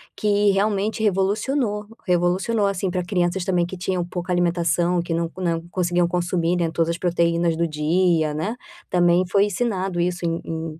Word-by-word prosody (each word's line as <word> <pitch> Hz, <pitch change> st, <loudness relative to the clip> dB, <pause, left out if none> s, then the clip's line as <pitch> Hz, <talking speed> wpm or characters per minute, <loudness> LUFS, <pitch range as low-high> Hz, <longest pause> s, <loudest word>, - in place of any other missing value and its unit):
que 205 Hz, -1 st, +2 dB
realmente 205 Hz, +2 st, 0 dB
revolucionou, 210 Hz, +3 st, 0 dB, 0.2 s
revolucionou, 180 Hz, +5 st, +1 dB
assim, 195 Hz, -1 st, -1 dB
para 180 Hz, 0 st, -2 dB
crianças 180 Hz, 0 st, 0 dB
também 175 Hz, -2 st, +1 dB
que 190 Hz, -, -7 dB
tinham 180 Hz, 0 st, -1 dB
pouca 180 Hz, +1 st, -4 dB
alimentação, 175 Hz, 0 st, +1 dB
que 170 Hz, 0 st, -2 dB
não 165 Hz, 0 st, -1 dB
não 170 Hz, -3 st, -1 dB
conseguiam 175 Hz, -1 st, +1 dB
consumir, 175 Hz, 0 st, 0 dB
né, 170 Hz, -2 st, 0 dB
todas 165 Hz, 0 st, 0 dB
as 170 Hz, -, -1 dB
proteínas 170 Hz, -1 st, +1 dB
do 170 Hz, +1 st, 0 dB
dia 160 Hz, +1 st, +1 dB
né, 160 Hz, +10 st, -2 dB, 0.3 s
também 175 Hz, 0 st, +3 dB
foi 200 Hz, +3 st, +3 dB
ensinado 195 Hz, -4 st, -2 dB
isso 175 Hz, 0 st, -1 dB
em 165 Hz, 0 st, -1 dB
em 160 Hz, -1 st, -5 dB
175 Hz, 165 wpm, -22 LUFS, 170-195 Hz, 0.3 s, também